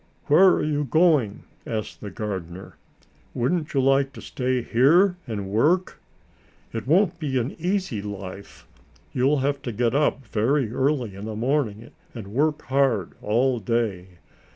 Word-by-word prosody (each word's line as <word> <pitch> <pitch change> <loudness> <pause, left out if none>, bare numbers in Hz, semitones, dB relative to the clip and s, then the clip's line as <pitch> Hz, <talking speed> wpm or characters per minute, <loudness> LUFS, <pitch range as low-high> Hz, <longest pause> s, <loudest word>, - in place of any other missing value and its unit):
"Where 165 +6 +6
are - - 0
you 150 -1 0
going?" 145 - +2 0.2
asked 110 -2 -4
the 105 - -6
gardener. 95 -4 -6 0.6
"Wouldn't 150 +5 -1
you 135 - +3
like 135 +1 +2
to - - -10
stay 125 -1 -1
here 165 - +4
and 105 -4 -4
work? 160 - +1 0.7
It 115 +2 -5
won't 170 +2 +3
be 140 -5 -1
an 125 +3 -1
easy 180 - -1
life. 100 -1 -8 0.5
You'll 135 +2 +2
have 140 0 -1
to 125 - -4
get 115 +1 0
up 140 -2 +1
very 115 +3 0
early 130 -5 0
in 100 +2 -8
the 110 -1 -5
morning 120 -2 -1 0.2
and 110 -4 -7
work 150 +7 0
hard 130 -8 +1
all 120 +4 +1
day. 95 -5 -2
125 Hz, 150 wpm, -24 LUFS, 110-145 Hz, 0.7 s, Where